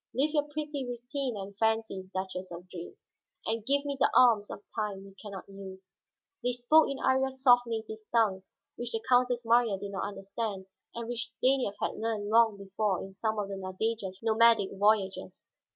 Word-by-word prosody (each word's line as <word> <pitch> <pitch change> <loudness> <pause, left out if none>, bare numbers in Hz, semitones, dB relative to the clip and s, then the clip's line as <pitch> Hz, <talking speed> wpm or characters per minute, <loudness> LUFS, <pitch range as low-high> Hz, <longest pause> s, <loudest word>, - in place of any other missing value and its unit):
Live 285 +5 +2
your 295 -1 +1
pretty 295 -2 -4
routine 245 0 -4
and 195 0 -7
fancies, 220 -4 0
Duchess 185 -1 -4
of 175 +1 -9
Dreams, 180 - -10 0.3
and 225 0 -1
give 280 +4 +2
me 285 -1 -2
the 270 - +4
alms 225 -5 +5
of 205 - -8
time 205 -3 -3
you 195 - -13
can 210 - -8
not 190 -2 -8
use." 190 -1 -11 0.5
They 245 0 0
spoke 245 +6 +5
in 275 - -3
Iría's 265 0 +1
soft 245 -2 +6
native 220 -1 -4
tongue, 215 -5 +2 0.4
which 240 0 -4
the 225 0 -2
Countess 245 -1 +3
Marya 230 -3 +4
did 200 +1 -6
not 195 - -2
understand 195 0 -4 0.3
and 235 -1 -4
which 240 -1 -3
Stanief 250 -2 +1
had - - -2
learned 215 -2 -2
long 225 -1 +5
before 200 0 -1
in 195 - -8
some 215 +2 -2
of 205 -1 -2
the 195 - -4
Nadeja's 190 +1 -3
nomadic 225 -2 +4
voyages. 200 -1 0
220 Hz, 185 wpm, -30 LUFS, 195-245 Hz, 0.5 s, soft